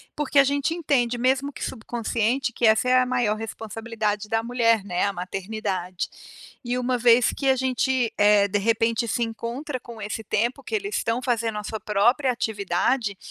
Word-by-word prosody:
porque 290 -1 -1
a 275 - +9
gente 285 +4 0
entende, 250 -7 +1
mesmo 265 +3 +1
que - - -8
subconsciente, 240 +1 -1
que 230 - +2
essa 220 +3 +3
é 255 0 +5
a - - +1
maior 245 -4 +1
responsabilidade 220 -1 -4
da 225 0 0
mulher, 230 -3 +2
né, 180 0 0
a 200 - 0
maternidade. 190 -1 -4 0.6
E 245 +1 -2
uma 250 0 0
vez 240 0 +5
que 275 - -2
a 265 - +5
gente, 260 -1 0
eh, 205 -1 +5
de 205 +1 0
repente, 230 +2 +1
se 235 +2 0
encontra 240 +5 -4
com 235 -2 -11
esse 210 +2 -5
tempo 235 +6 -1
que 440 - -3
eles 410 0 -2
estão 230 +2 0
fazendo 230 -3 -1
a 210 - -4
sua 220 +1 -5
própria 240 +6 +2
atividade. 210 0 -1
230 Hz, 180 wpm, -24 LUFS, 215-255 Hz, 0.6 s, a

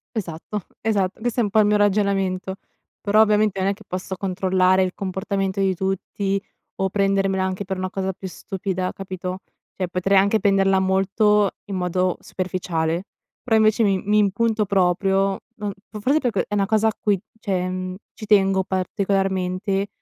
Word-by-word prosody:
Esatto 185 +1 -5
esatto. 200 -4 0
Questo 240 +1 -1
è 235 - +4
un 205 - 0
po' 215 +2 +3
il 210 - +5
mio 210 0 +3
ragionamento. 195 -2 +1 0.5
Però 210 0 +3
ovviamente 210 -2 +3
non 190 - +1
è - - +1
che 210 +2 -15
posso 185 0 -4
controllare 185 0 +2
il 185 0 -2
comportamento 195 0 -2
di 195 -1 +2
tutti 195 +1 -2 0.3
o 190 0 0
prendermela 195 -1 +1
anche 190 +1 -2
per 190 0 -3
una 185 0 -2
cosa 190 0 -2
più 190 - -7
stupida 185 0 -3
capito? 185 -1 -5 0.4
Cioè 185 -2 -2
potrei 185 +2 +1
anche 200 +3 +4
prenderla 195 -2 +3
molto 195 +2 +2
in 200 - -5
modo 180 0 0
superficiale, 175 -2 -2 0.4
però 225 -3 +3
invece 220 +1 +4
mi 195 -2 +2
mi 210 +1 +3
impunto 210 +2 +1
proprio. 195 +1 +2 0.2
No, 210 -3 -4 0.2
f 215 - -7
forse 275 +8 +2
perché 245 -6 0
è - - -6
una 200 -1 +1
cosa 220 +1 +3
a 220 - -3
cui 205 -3 +1 0.2
cioè 185 -4 -1
mhmm, 185 0 -4 0.2
ci 215 - -9
tengo 195 -2 +4
particolarmente, 190 +1 -1
195 Hz, 170 wpm, -22 LUFS, 185-205 Hz, 0.5 s, il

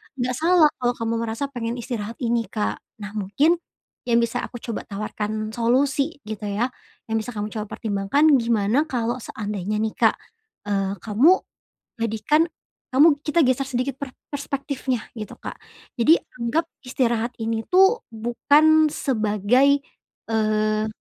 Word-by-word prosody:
enggak 250 -1 -1
salah 330 -1 +5
kalau 245 0 +1
kamu 230 0 -2
merasa 250 +6 -3
pengen 235 -2 -3
istirahat 230 -3 -5
ini, 235 -1 +1
Kak. 210 -2 -2 0.3
Nah, 205 - -6
mungkin 245 - +1 0.5
yang 235 -1 +4
bisa 235 +1 -1
aku - - -12
coba 230 -3 -5
tawarkan 215 +1 -4
solusi, 270 +5 +1
gitu 215 -1 -6
ya, 225 +6 -1 0.4
yang 225 - +2
bisa 220 +1 -6
kamu 210 +1 -3
coba 215 -1 -4
pertimbangkan, 220 +9 +2
gimana 230 +5 +1
kalau 240 -1 -1
seandainya 210 -3 -4
nih, 215 +1 0
Kak, - - +4 0.5
eee, 195 -1 -1
kamu, 255 - +4 0.6
jadikan, 230 +8 +2 0.5
kamu 290 +5 +7 0.2
kita 320 +2 +3
geser 260 +1 +2
sedikit 255 +1 -2
per 275 -3 -6 0.2
perspektifnya, 275 -3 -3 0.2
gitu, 215 - -6
Kak. - - -7 0.4
Jadi, 300 +8 +6 0.2
anggap 280 +8 0 0.2
istirahat 240 -2 0
ini 225 0 -2
tuh, 385 +6 +4
bukan 295 +7 +4
sebagai, 245 +4 +2 0.5
eee, 215 -1 +1
235 Hz, 135 wpm, -23 LUFS, 215-275 Hz, 0.6 s, kamu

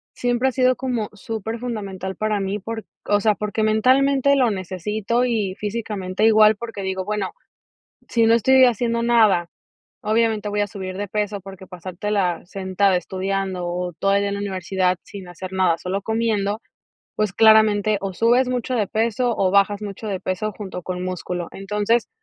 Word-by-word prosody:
siempre 245 +2 +1
ha - - -4
sido 255 0 +3
como 245 -5 -2
superfundamental 215 -3 -5
para 215 -1 0
mí 195 +2 -2
por, 220 +2 -6 0.2
o 205 0 +2
sea, 215 -1 +3
porque, 210 +1 -3
mentalmente 265 +5 +3
lo 255 -4 +3
necesito 205 +5 -2
y 215 -6 0
físicamente 210 -2 -2
igual, 215 -1 +6
porque, 225 -2 -7
digo, 190 -1 -3
bueno, 210 -1 -2 0.8
si 230 -2 +3
no 225 - +5
estoy 260 +3 +5
haciendo 235 0 +1
nada, 215 -8 +3 0.5
obviamente 220 -1 +1
voy 205 0 0
a 205 - 0
subir 190 -2 -6
de 205 0 -3
peso, 205 -1 -2
porque, 190 -1 -11
pasartela 185 +1 -2
sentada 190 0 0
estudiando, 190 0 -2
o 180 0 -3
todo 195 +4 +1
el 200 - +3
día 200 - 0
en 200 - -2
la 200 - -4
universidad 185 -2 0
sin 195 -3 -10
hacer 180 +2 -8
nada 185 -3 +2
solo 190 +3 -3
comiendo, 220 -1 -1 0.5
pues, 210 -3 0
claramente 215 -1 +5
o 195 -1 -4
subes 240 +6 +3
mucho 250 0 -2
de 210 -3 +1
peso, 230 +2 0
o 190 -1 +2
bajas 200 +1 +3
mucho 210 +1 -6
de 190 -2 -2
peso 200 +3 -2
junto 190 -4 -7
con 180 -1 -4
músculo. 180 -1 -4
Entonces 210 +4 0
205 Hz, 170 wpm, -22 LUFS, 190-225 Hz, 0.8 s, igual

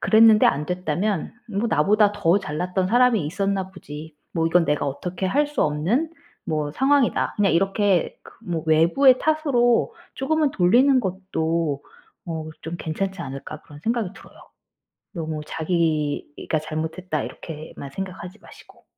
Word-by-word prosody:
그랬는데 220 -1 +6
안 150 +2 +1
됐다면 180 +1 -2 0.2
'뭐 210 +2 -1
나보다 205 +5 +3
더 185 -1 +2
잘났던 180 +2 -2
사람이 240 -6 +4
있었나 195 +2 -1
보지. 155 -3 -10 0.2
뭐 165 -1 +1
이건 170 +1 +3
내가 150 -1 0
어떻게 180 +7 -4
할 290 +9 +2
수 295 - -1
없는 185 - 0 0.4
뭐 150 -2 -1
상황이다.' 270 - +2
그냥 200 -5 +3
이렇게 195 +1 +1
그 - - -15
뭐 170 -3 -3
외부의 175 - +5
탓으로 280 -7 +2 0.2
쪼금은 300 +2 +1
돌리는 250 +9 +4
것도 165 - -2 0.4
어 160 -2 -4
좀 165 +2 -5
괜찮지 190 +3 -3
않을까 135 +2 -7
그런 145 0 -14
생각이 225 -2 -1
들어요. - - -16 0.8
너무 160 -3 -4
자기가 155 -2 -1
'잘못했다.' 155 +1 -3
이렇게만 150 -3 -8
생각하지 185 +2 -7
마시고. - - -17
180 Hz, 310 characters per minute, -23 LUFS, 155-215 Hz, 0.8 s, 그랬는데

